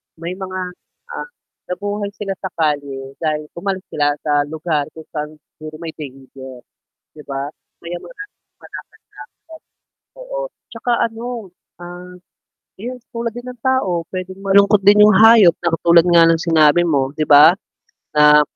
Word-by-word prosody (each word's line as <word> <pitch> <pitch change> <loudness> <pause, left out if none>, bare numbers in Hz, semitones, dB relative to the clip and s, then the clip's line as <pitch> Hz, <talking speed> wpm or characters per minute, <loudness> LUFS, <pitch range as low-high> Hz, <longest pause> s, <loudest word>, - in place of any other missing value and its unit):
May 170 +2 -6
mga, 185 0 -5 0.5
ah, 475 - -6 0.4
nabuhay 205 +3 -3
sila 195 -2 -4
sa 190 - -4
kalye 140 -4 -2
dahil 155 -1 -2
umalis 190 0 -3
sila 145 -1 +1
sa 145 -1 +1
lugar 155 -1 -2
kung 160 - -10
saan 150 0 -5 0.2
siguro 155 0 -9
may 165 - -5
danger. 130 -2 -11 0.5
'Di 150 - -11
ba 140 0 -4 0.3
kaya 170 +1 -6
maraming 410 - -12 0.2
palakad-lakad. - - -10 1.3
Oo, - - -6 0.3
'tsaka 235 +1 -4 0.2
ano, 230 -3 -7 0.3
ah, 180 +1 -10 0.6
yes 245 +5 -7
tulad 230 -2 -4
din 240 - -7
ng 250 - -10
tao 195 -11 0
pwedeng 185 0 -6
malungkot 200 +1 +4
din 205 +1 +7
yung 210 -1 +6
hayop 220 -6 +7
na 170 - +1
katulad 170 0 +4
nga 170 -1 +5
ng 165 - +3
sinabi 165 0 +4
mo 140 -5 +1
'di 155 - 0
ba, 150 +5 +7 0.6
na 150 0 +7
175 Hz, 145 wpm, -18 LUFS, 150-205 Hz, 1.3 s, din